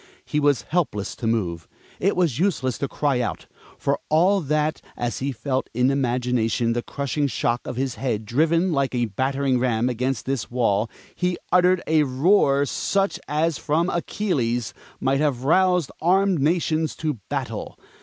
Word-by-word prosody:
He 150 - -1
was 145 -4 +2
helpless 125 - -1
to 115 - -3
move; 90 -8 -1 0.3
it 195 - +1
was 165 -8 +1
useless 145 - 0
to 140 - -1
cry 140 -2 0
out. 120 - -3 0.3
For - - 0
all 185 +6 +4
that, 155 +1 0 0.2
as 120 -1 -2
he 140 +1 -1
felt 130 +2 -2
in 125 +2 +3
imagination 120 -3 0
the 120 - -1
crushing 140 +2 -2
shock 120 -1 -1
of - - -4
his 130 0 -1
head 115 -5 -1
driven 165 - +2
like 140 -4 0
a 120 -1 +1
battering 130 +4 0
ram 120 -1 +1
against 125 0 -2
this 135 -1 -2
wall, 115 -3 +1 0.2
he 180 0 -1
uttered 180 0 +4
a 160 -1 +3
roar 140 +1 +3
such 195 +8 0
as 155 0 0
from 165 +4 +1
Achilles 125 - -1 0.3
might 135 +1 +1
have 140 -5 0
roused 180 +1 +3
armed 190 +1 +3
nations 160 +1 +1
to 150 -7 -3
battle. - - -4
140 Hz, 160 wpm, -23 LUFS, 120-160 Hz, 0.3 s, all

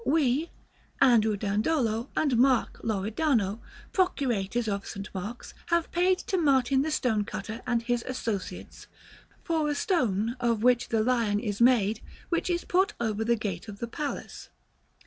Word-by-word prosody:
We, 295 - +1 0.5
Andrew 220 -5 +4
Dandolo 220 +3 0
and 285 -5 +2
Mark 255 +1 +2
Loredano, 220 0 0 0.3
procurators 240 - 0
of 200 -1 -2
St. 195 +1 -6
Mark's, 205 +5 -6
have 340 -1 +1
paid 365 +1 +3
to 375 - 0
Martin 270 -3 +3
the 310 - -1
stone 225 -8 +1
cutter 215 +2 -6
and 235 -2 +1
his 240 0 -1
associates... 230 -6 -5 0.6
for 320 -3 0
a 295 - 0
stone 235 - 0
of 230 -2 0
which 250 0 +3
the 220 -1 +2
lion 230 -4 +1
is 210 -1 -3
made 225 -4 +4 0.3
which 340 +1 0
is 345 -1 -1
put 385 +4 +2
over 220 -2 -1
the 235 +1 +2
gate 200 -3 -4
of 205 -2 -8
the 235 - -4
palace." 285 +5 -6
235 Hz, 150 wpm, -28 LUFS, 215-280 Hz, 0.6 s, Andrew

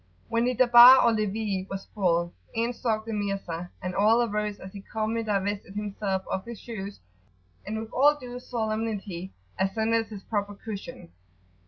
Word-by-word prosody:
When 230 +1 +1
the 250 0 +1
Darbar 245 +1 +9
or 235 - +5
levee 210 -2 -1
was 195 0 -5
full, 175 -3 +1 0.2
in 230 +2 0
stalked 220 -3 -1
the 225 - -4
Mirza, 195 -4 -3
and 185 0 -3
all 220 +5 +4
arose 210 -2 -2
as 190 - -10
he 200 - -8
calmly 220 +2 -2
divested 205 -2 -2
himself 200 -2 -2
of 190 - -2
his 235 -2 -8
shoes; 205 -4 -7 0.7
and 215 +1 -3
with 220 +1 -7
all 290 +3 +5
due 250 -1 -7
[p.87]solemnity 215 -6 -3 0.3
ascended 220 +4 +1
his 205 -3 -9
proper 205 -2 -2
cushion. 200 - -8
210 Hz, 160 wpm, -27 LUFS, 195-230 Hz, 0.7 s, Darbar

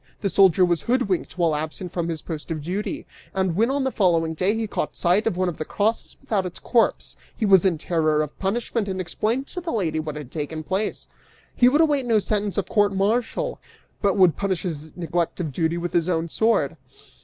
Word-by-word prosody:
The 200 - 0
soldier 185 -1 +5
was 175 -3 +1
hoodwinked 230 - 0
while 165 -3 +2
absent 160 +4 -4
from 170 -2 -2
his 160 -2 -4
post 160 -1 -6
of 155 -3 -3
duty, 190 +6 -3 0.3
and 190 -3 0
when 225 +6 +3
on 275 0 0
the 265 - 0
following 165 -6 +2
day 185 +6 +1
he 225 - -1
caught 210 - -3
sight 185 +5 +2
of 185 - 0
one 185 0 +1
of 175 - -3
the - - -1
crosses 215 +7 -1
without 220 -8 -1
its 180 -1 -6
corpse, 235 -2 +1 0.2
he 220 - 0
was 195 -2 +6
in 180 -4 +2
terror 155 -2 +1
of 150 - -9
punishment 220 +2 -1
and 190 -1 -3
explained 215 +8 -1
to 360 - -5
the 345 - -5
lady 165 -8 0
what 155 -1 -4
had 145 -4 -8
taken 155 0 -4
place: 190 +6 -2 0.5
He 245 - +6
would 295 +5 +4
await 290 -5 +2
no 225 -2 +4
sentence 205 -1 -1
of 200 - 0
court 205 -2 +2
martial, 220 +5 0 0.4
but 200 -1 +2
would 185 -4 +5
punish 195 -3 -1
his 160 -4 -4
neglect 170 0 -2
of 160 -6 -3
duty 165 +3 0
with 175 0 -4
his 170 0 +2
own 165 -1 0
sword! 220 -8 +1
185 Hz, 215 wpm, -24 LUFS, 165-215 Hz, 0.5 s, was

